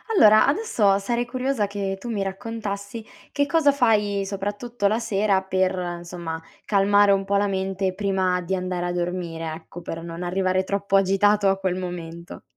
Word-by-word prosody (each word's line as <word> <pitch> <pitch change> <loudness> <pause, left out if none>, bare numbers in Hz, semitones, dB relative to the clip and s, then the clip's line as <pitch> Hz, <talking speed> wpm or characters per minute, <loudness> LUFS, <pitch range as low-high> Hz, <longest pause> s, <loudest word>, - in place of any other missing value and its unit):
Allora, 215 - +7
adesso 245 - +2
sarei 240 +4 -1
curiosa 250 -3 -1
che 195 -1 -3
tu 240 - -7
mi 205 -3 -1
raccontassi 200 +1 -5 0.3
che 285 - +1
cosa, 290 -1 +3
fai 210 -7 +2
soprattutto 205 +3 -2
la 215 +2 +1
sera 205 -3 +1
per, 190 0 +1
insomma, 175 -2 -5 0.2
calmare 205 0 +4
un 195 0 +2
pò 200 +1 +1
la 205 +1 +2
mente 190 -1 -1
prima 190 -2 0
di 180 +2 -2
andare 180 -1 -3
a - - -1
dormire, 175 -2 -3
ecco 165 +2 -10
per 165 -1 -6
non 170 +1 -6
arrivare 185 +1 0
troppo 200 +1 -1
agitato 195 +1 +3
a 195 - +1
quel 190 -2 -1
momento. 170 -2 -7
195 Hz, 165 wpm, -24 LUFS, 180-210 Hz, 0.3 s, Allora